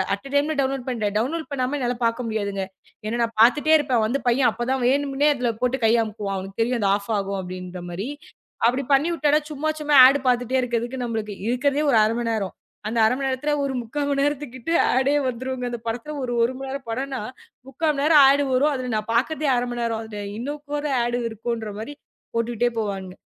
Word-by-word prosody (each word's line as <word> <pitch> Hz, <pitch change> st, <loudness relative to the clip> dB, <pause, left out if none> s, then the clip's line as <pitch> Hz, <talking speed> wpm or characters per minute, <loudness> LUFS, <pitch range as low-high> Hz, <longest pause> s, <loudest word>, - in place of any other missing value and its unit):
அட்டை 200 Hz, +7 st, -12 dB
டைம்ல 290 Hz, +2 st, +2 dB
டவுன்லோட் 270 Hz, -1 st, -2 dB
பண்ணிட்டேன். 215 Hz, -5 st, -1 dB
டவுன்லோட் 315 Hz, +8 st, -2 dB
பண்ணாம 260 Hz, 0 st, -1 dB
என்னால 245 Hz, -2 st, 0 dB
பாக்க 230 Hz, +2 st, 0 dB
முடியாதுங்க. 200 Hz, -3 st, -2 dB, 0.4 s
ஏன்னா 235 Hz, +2 st, -2 dB
நான் 230 Hz, -1 st, -4 dB
பாத்துட்டே 295 Hz, +7 st, +5 dB
இருப்பேன், 265 Hz, -6 st, +1 dB
வந்து 265 Hz, +5 st, -1 dB
பையன் 250 Hz, +2 st, +3 dB
அப்பத் 240 Hz, +1 st, -4 dB
தான் 265 Hz, -, -1 dB
வேணும்னு 280 Hz, +2 st, +2 dB
அதுல 250 Hz, -2 st, -1 dB
போட்டு 250 Hz, +1 st, +1 dB
கைய 230 Hz, +1 st, +4 dB
அமுக்குவான். 205 Hz, -2 st, -4 dB
அவனுக்குத் 195 Hz, +3 st, -5 dB
தெரியும் 245 Hz, +1 st, -1 dB
அது 200 Hz, -, +2 dB
ஆஃப் 200 Hz, 0 st, -6 dB
ஆகும், 195 Hz, 0 st, -3 dB
அப்படின்ற 180 Hz, 0 st, -7 dB
மாரி. 195 Hz, +9 st, -4 dB, 0.6 s
அப்படி 255 Hz, +3 st, 0 dB
பண்ணி 280 Hz, +5 st, +3 dB
வுட்டாத, 300 Hz, -2 st, +3 dB
சும்மா 305 Hz, +1 st, -2 dB
சும்மா 300 Hz, -1 st, +1 dB
ஆட் 275 Hz, +2 st, +3 dB
பாத்துட்டே 245 Hz, 0 st, +1 dB
இருக்கறதுக்கு, 240 Hz, +1 st, -2 dB
நம்மளுக்கு 220 Hz, -3 st, -3 dB
இருக்கறதே 275 Hz, +4 st, +1 dB
ஒரு 235 Hz, -, +4 dB
அரை 215 Hz, +1 st, +2 dB
மணி 240 Hz, -1 st, -1 dB
நேரம். 205 Hz, -4 st, -2 dB, 0.3 s
அந்த 225 Hz, +2 st, -3 dB
1/2 220 Hz, -, +3 dB
மணி 270 Hz, -, -1 dB
நேரத்துல, 265 Hz, +3 st, -1 dB
ஒரு 275 Hz, -1 st, -1 dB
3/4 285 Hz, +5 st, -3 dB
மணி 280 Hz, -1 st, +1 dB
நேரத்துக்கிட்ட 290 Hz, -1 st, -3 dB, 0.2 s
ஆடெ 265 Hz, +2 st, +2 dB, 0.2 s
வந்துருங்க. 255 Hz, +1 st, -4 dB
அந்தப் 235 Hz, -1 st, -7 dB
படத்துல 240 Hz, +6 st, -4 dB
ஒரு 245 Hz, -1 st, -2 dB
1 240 Hz, +3 st, +1 dB
மணி 270 Hz, 0 st, -6 dB
நேரம் 275 Hz, -2 st, -6 dB
படம்னா 265 Hz, +2 st, -3 dB, 0.5 s
3/4 300 Hz, +2 st, 0 dB
நேரம் 300 Hz, 0 st, +6 dB
ஆட் 285 Hz, +1 st, +3 dB
வரும். 290 Hz, +4 st, +3 dB
அது 250 Hz, -2 st, -3 dB
நான் 215 Hz, +1 st, -5 dB
பாக்கறதே 300 Hz, +6 st, 0 dB
அரை 245 Hz, 0 st, 0 dB
மணி 240 Hz, 0 st, -3 dB
நேரம். 225 Hz, -1 st, -1 dB
அதுல 215 Hz, -2 st, -7 dB, 0.2 s
இன்னும் 285 Hz, +5 st, -5 dB
கூட 295 Hz, 0 st, -2 dB, 0.2 s
ஆட் 240 Hz, 0 st, -1 dB
இருக்குன்ற 225 Hz, 0 st, -4 dB
மாரி 285 Hz, +7 st, -7 dB, 0.4 s
போட்டுட்டே 235 Hz, +1 st, 0 dB
போவானுக. 195 Hz, -3 st, -4 dB
245 Hz, 200 wpm, -23 LUFS, 225-275 Hz, 0.6 s, நேரம்